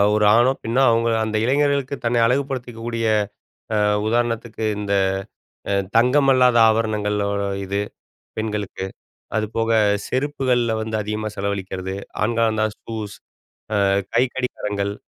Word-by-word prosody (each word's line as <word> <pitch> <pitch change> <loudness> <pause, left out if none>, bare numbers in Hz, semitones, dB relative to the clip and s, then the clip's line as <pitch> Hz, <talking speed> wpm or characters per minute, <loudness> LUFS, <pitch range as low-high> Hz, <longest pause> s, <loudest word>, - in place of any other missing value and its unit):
ஒரு 105 0 +3
ஆணோ, 120 +2 +5
பெண்ணோ, 120 +4 +1
அவுங்க 115 0 +2
அந்த 110 0 -1
இளைஞர்களுக்கு 140 +1 +1
தன்னை 120 0 +2
அழகுபடுத்திக்கக்கூடிய 120 -3 -2 0.7
அ - - +2 0.3
உதாரணத்துக்கு 115 -1 -1 0.2
இந்த 100 -1 -4 0.8
அ - - +2 0.2
தங்கமல்லாத 125 0 +4
ஆபரணங்கள் 105 -2 0
ஓ - - -1 0.3
இது 100 +1 -2 0.6
பெண்களுக்கு. 105 -3 -3 0.5
அதுபோக 115 +1 -1 0.4
செருப்புகள்ல 130 -4 0
வந்து 110 0 -5
அதிகமா 105 +1 -3
செலவழிக்கிறது. 95 -1 -3 0.3
ஆண்களானா 110 -1 +1
ஷூஸ், 110 -3 -6 0.7
அ - - +3 0.3
கைக்கடிகாரங்கள், 115 -5 -1
115 Hz, 105 wpm, -21 LUFS, 105-125 Hz, 0.8 s, ஆணோ